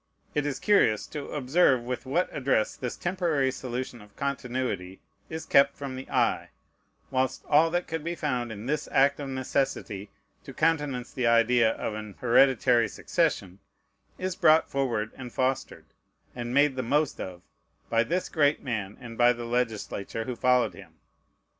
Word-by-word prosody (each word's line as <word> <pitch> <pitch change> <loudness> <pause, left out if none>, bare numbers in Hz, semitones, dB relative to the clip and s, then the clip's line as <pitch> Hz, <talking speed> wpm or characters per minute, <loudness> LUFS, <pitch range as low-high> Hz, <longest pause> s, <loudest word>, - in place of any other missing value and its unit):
It 145 -1 0
is 145 - -2
curious 200 - +3
to 150 -2 -7
observe 135 -2 +2
with 125 +2 -5
what 170 +7 +1
address 130 -6 +1
this 125 -2 -5
temporary 170 -7 0
solution 125 -2 -5
of 105 0 -17
continuity 125 -9 -3 0.3
is 160 0 -5
kept 140 0 +4
from 140 -2 -5
the 130 - -8
eye; - - +1 0.6
whilst 130 0 -1
all 155 +2 +5
that 175 +1 -1
could 160 -2 -4
be 170 +1 -3
found 125 -7 -2
in 110 0 -7
this 150 +3 -2
act 140 +1 +3
of 140 -2 -5
necessity 130 -6 -2 0.3
to 135 - -10
countenance 145 -6 0
the 125 -2 0
idea 115 0 +4
of 110 - -4
an 105 -1 -7
hereditary 125 -1 +4
succession 100 - -1 0.6
is 185 -1 -3
brought 160 -4 +4
forward, 120 -6 -1
and 125 -2 -8
fostered, 130 0 -1 0.5
and 120 -1 -4
made 140 +1 +3
the 130 - -1
most 145 +4 0
of, 90 -1 -7 0.5
by 115 0 +4
this 180 +9 -1
great 145 -2 +2
man, 105 -6 -3
and 115 -2 -10
by 120 0 +6
the 120 -1 -5
legislature 115 -3 -2
who 125 +2 -4
followed 125 +1 +2
him. - - -14
130 Hz, 160 wpm, -27 LUFS, 120-145 Hz, 0.6 s, by